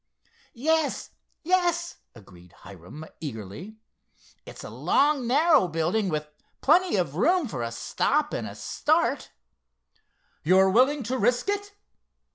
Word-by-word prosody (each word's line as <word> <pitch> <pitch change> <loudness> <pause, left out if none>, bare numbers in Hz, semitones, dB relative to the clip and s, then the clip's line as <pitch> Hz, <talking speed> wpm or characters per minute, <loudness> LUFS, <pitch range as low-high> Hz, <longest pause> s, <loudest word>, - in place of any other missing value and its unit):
"Yes, 315 +4 0 0.3
yes," 345 -1 0 0.2
agreed 90 -5 -17
Hiram 95 - -11
eagerly. 140 - -8 0.7
"It's - - -10
a - - -8
long 285 -3 +1
narrow 295 - +4
building, 175 +6 -1
with 150 -2 -3 0.3
plenty 355 +3 +3
of 175 -6 -1
room 345 - +2
for 130 - -5
a 115 0 -3
stop 115 0 -1
and - - -3
a - - -9
start." - - 0 1.1
"You're 190 +4 +4
willing 260 +6 +3
to 255 +3 -3
risk 245 - +1
it?" 405 0 -3
220 Hz, 120 wpm, -26 LUFS, -, 1.1 s, narrow